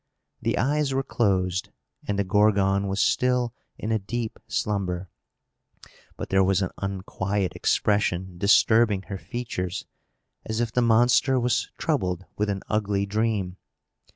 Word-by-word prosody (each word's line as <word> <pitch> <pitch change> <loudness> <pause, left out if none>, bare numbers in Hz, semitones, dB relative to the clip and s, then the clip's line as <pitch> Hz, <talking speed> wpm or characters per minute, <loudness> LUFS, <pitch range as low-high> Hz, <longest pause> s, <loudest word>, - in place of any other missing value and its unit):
The - - 0
eyes 140 +1 +1
were 135 - +1
closed, 95 -7 0 0.4
and 100 - -1
the 100 - +2
Gorgon 100 0 +3
was 95 +1 -2
still 125 +1 +2 0.2
in 110 - -3
a 110 - +2
deep 110 +3 -4
slumber; 95 -3 -2 1.1
but - - -5
there 95 0 +4
was 95 0 +2
an 90 - -3
unquiet 95 0 -2
expression 95 -4 0
disturbing 105 0 +4
her 95 -2 -4
features, 100 -7 -4 0.6
as 110 0 -3
if 120 -2 0
the 125 - +1
monster 120 +3 +4
was 120 -2 0
troubled 90 0 -1
with 105 0 -1
an 95 -1 -2
ugly 100 -2 0
dream. 105 -3 -1
100 Hz, 135 wpm, -25 LUFS, 95-115 Hz, 1.1 s, there